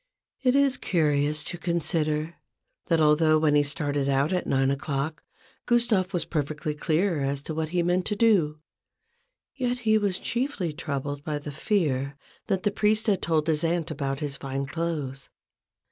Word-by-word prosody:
It 255 Hz, -1 st, +3 dB
is 280 Hz, -1 st, +3 dB
curious 150 Hz, -3 st, +1 dB
to 175 Hz, -, -6 dB
consider, 160 Hz, -2 st, 0 dB, 0.5 s
that 165 Hz, -3 st, +3 dB
although 155 Hz, +1 st, +4 dB
when 155 Hz, -1 st, +3 dB
he 145 Hz, -, +5 dB
started 145 Hz, -1 st, -1 dB
out 140 Hz, +5 st, +2 dB
at 180 Hz, -, -1 dB
nine 135 Hz, 0 st, +2 dB
o'clock, 140 Hz, +2 st, -2 dB, 0.5 s
Gustave 235 Hz, -6 st, +2 dB
was 175 Hz, -, 0 dB
perfectly 150 Hz, 0 st, -2 dB
clear 160 Hz, +3 st, 0 dB
as 140 Hz, 0 st, -2 dB
to 160 Hz, -, -5 dB
what 155 Hz, 0 st, -2 dB
he 175 Hz, 0 st, +1 dB
meant 180 Hz, +1 st, +1 dB
to 210 Hz, -, 0 dB
do, 195 Hz, -9 st, +3 dB, 1.0 s
yet 250 Hz, -2 st, -1 dB
he 220 Hz, 0 st, +4 dB
was 200 Hz, -3 st, 0 dB
chiefly 235 Hz, -, -2 dB
troubled 145 Hz, -2 st, -4 dB
by 150 Hz, -1 st, -2 dB
the 145 Hz, 0 st, -6 dB
fear 140 Hz, -5 st, 0 dB, 0.3 s
that 190 Hz, -1 st, 0 dB
the 205 Hz, -, +2 dB
priest 215 Hz, +1 st, +1 dB
had 200 Hz, -4 st, +2 dB
told 160 Hz, -2 st, +1 dB
his 155 Hz, -1 st, +1 dB
aunt 165 Hz, 0 st, 0 dB
about 135 Hz, -1 st, -3 dB
his 145 Hz, -2 st, -2 dB
fine 135 Hz, 0 st, -3 dB
clothes. 140 Hz, -3 st, -4 dB
155 Hz, 165 wpm, -26 LUFS, 145-185 Hz, 1.0 s, he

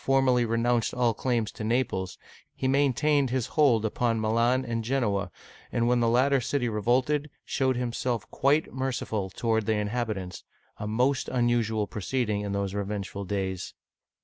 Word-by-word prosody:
formally 135 Hz, -2 st, +3 dB
renounced 115 Hz, +1 st, +1 dB
all 120 Hz, -2 st, +2 dB
claims 115 Hz, -2 st, -1 dB
to -, -, -7 dB
Naples, 110 Hz, -5 st, -1 dB, 0.4 s
he 130 Hz, -, -1 dB
maintained 140 Hz, +1 st, +2 dB
his 125 Hz, -2 st, 0 dB
hold 130 Hz, -8 st, +4 dB
upon 115 Hz, +1 st, 0 dB
Milan 115 Hz, +4 st, +2 dB
and 115 Hz, -1 st, -2 dB
Gen'oa, 105 Hz, -6 st, 0 dB, 0.4 s
and 120 Hz, 0 st, +1 dB
when 125 Hz, 0 st, +3 dB
the 115 Hz, -1 st, +2 dB
latter 130 Hz, +3 st, +3 dB
city 125 Hz, 0 st, -1 dB
revolted, 125 Hz, +7 st, +1 dB, 0.2 s
showed 130 Hz, -2 st, +1 dB
himself 120 Hz, -2 st, -2 dB
quite 145 Hz, +4 st, +1 dB
merciful 125 Hz, -6 st, -2 dB
toward 110 Hz, +2 st, -1 dB
the 110 Hz, -, +3 dB
inhabitants, 105 Hz, -3 st, -3 dB, 0.2 s
— -, -, -38 dB
a 105 Hz, -, -4 dB
most 125 Hz, +5 st, +1 dB
unusual 120 Hz, -3 st, +1 dB
proceeding 105 Hz, 0 st, -2 dB
in 100 Hz, -1 st, -3 dB
those 100 Hz, -1 st, -2 dB
revengeful 100 Hz, -1 st, -4 dB
days. 95 Hz, -2 st, -3 dB
120 Hz, 150 wpm, -27 LUFS, 105-130 Hz, 0.4 s, hold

